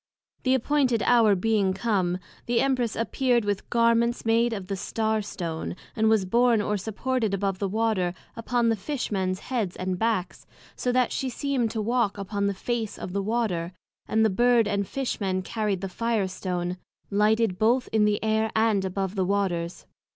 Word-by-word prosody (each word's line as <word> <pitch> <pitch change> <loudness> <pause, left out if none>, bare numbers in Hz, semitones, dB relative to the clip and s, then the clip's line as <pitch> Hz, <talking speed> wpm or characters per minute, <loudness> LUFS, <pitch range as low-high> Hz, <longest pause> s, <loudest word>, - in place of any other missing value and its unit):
The 260 0 +3
appointed 260 -4 +1
hour 230 -4 +5
being 200 -1 +1
come, 190 -4 0 0.3
the 240 0 +2
Empress 255 -4 +1
appear'd 240 0 +1
with 205 -1 -2
Garments 235 0 +2
made 230 +1 +3
of 200 -4 -4
the 195 +1 -3
Star 220 +3 -1
stone, 170 -5 -5 0.2
and 220 0 +3
was 220 -4 +3
born 235 +3 +3
or 210 0 0
supported 220 +2 -1
above 195 -1 -2
the 200 - -1
Water, 205 -4 0 0.2
upon 235 0 0
the 225 - +2
Fish 255 +6 -4
mens 185 -1 -1
heads 225 -9 -2
and 185 0 -3
backs, 220 -5 -1 0.3
so 250 - -1
that 250 -1 +2
she 265 - -2
seemed 255 -2 -1
to 220 -1 -3
walk 235 -2 +1
upon 200 0 -2
the 200 - -1
face 225 +1 -3
of 180 - -6
the 200 - 0
Water, 195 -5 -1 0.3
and 220 0 +3
the 220 - +3
Bird 240 +2 +4
and 200 -1 -1
Fish 270 -4 -3
men 185 -1 0
carried 210 -3 -2
the 195 - -2
Fire 225 +1 -1
stone, 180 -1 -3 0.3
lighted 210 -1 +2
both 245 +4 +3
in 220 -1 +3
the 210 0 +1
Air, 220 0 +1
and 220 -3 +3
above 190 0 -2
the 190 -3 0
Waters. 180 -3 -1
215 Hz, 180 wpm, -26 LUFS, 195-235 Hz, 0.3 s, hour